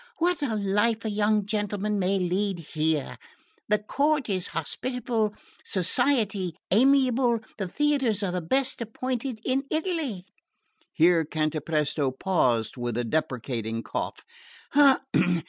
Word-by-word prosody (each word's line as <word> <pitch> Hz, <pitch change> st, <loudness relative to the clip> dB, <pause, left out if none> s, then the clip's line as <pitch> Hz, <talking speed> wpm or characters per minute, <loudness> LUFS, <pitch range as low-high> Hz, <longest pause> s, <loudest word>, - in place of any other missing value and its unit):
What 350 Hz, -1 st, +1 dB
a 250 Hz, -6 st, -1 dB
life 210 Hz, +3 st, +1 dB
a 220 Hz, -, -1 dB
young 210 Hz, 0 st, +2 dB
gentleman 210 Hz, 0 st, -1 dB
may 195 Hz, +1 st, +1 dB
lead 190 Hz, +1 st, 0 dB, 0.2 s
here! 155 Hz, -2 st, -1 dB, 0.5 s
The 210 Hz, -, +4 dB
court 280 Hz, +6 st, 0 dB
is 185 Hz, -3 st, 0 dB
hospitable, 225 Hz, -, -2 dB, 0.3 s
society 200 Hz, -, +1 dB, 0.2 s
amiable, 250 Hz, 0 st, +4 dB, 0.2 s
the 195 Hz, -, -2 dB
theatres 265 Hz, -4 st, +1 dB
are 190 Hz, -, 0 dB
the 180 Hz, 0 st, -2 dB
best 260 Hz, +10 st, 0 dB
appointed 245 Hz, +1 st, -3 dB
in 270 Hz, +1 st, 0 dB
Italy." 315 Hz, -, -2 dB, 0.7 s
Here 165 Hz, 0 st, +4 dB
Cantapresto 155 Hz, -2 st, -1 dB
paused 130 Hz, -, 0 dB
with 120 Hz, -1 st, -3 dB
a 120 Hz, -, 0 dB
deprecating 115 Hz, -4 st, -2 dB
cough. -, -, -4 dB
205 Hz, 115 wpm, -26 LUFS, 165-250 Hz, 0.7 s, The